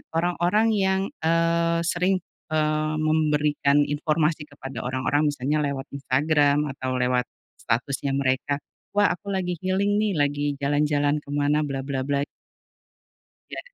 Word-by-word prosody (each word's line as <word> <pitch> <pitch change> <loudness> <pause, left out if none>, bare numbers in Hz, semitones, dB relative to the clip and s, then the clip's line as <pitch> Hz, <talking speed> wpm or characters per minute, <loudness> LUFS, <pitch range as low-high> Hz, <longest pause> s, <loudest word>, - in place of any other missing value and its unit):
orang-orang 175 +5 +2
yang, 190 -2 +2 0.2
eee, 165 +1 +2
sering, 180 +2 +1 0.3
eee, 155 -1 0
memberikan 150 -2 +2
informasi 150 +1 0
kepada 135 -4 -8
orang-orang, 130 +4 +1
misalnya 145 +1 0
lewat 140 0 -4
Instagram, 145 +1 +2
atau 130 -1 -3
lewat 125 0 +1 0.3
statusnya 135 +3 -1
mereka, 135 +1 0 0.4
"Wah 205 0 +4
aku 200 +3 -7
lagi 180 -2 -2
healing 190 +3 0
nih, 210 -2 +1
lagi 145 -1 0
jalan-jalan 145 +1 +1
kemana," 145 +1 0
bla 135 -1 -3
bla 135 -1 -3
bla. 140 0 +1 1.3
Ya, - - -4
150 Hz, 120 wpm, -24 LUFS, 140-165 Hz, 1.3 s, Wah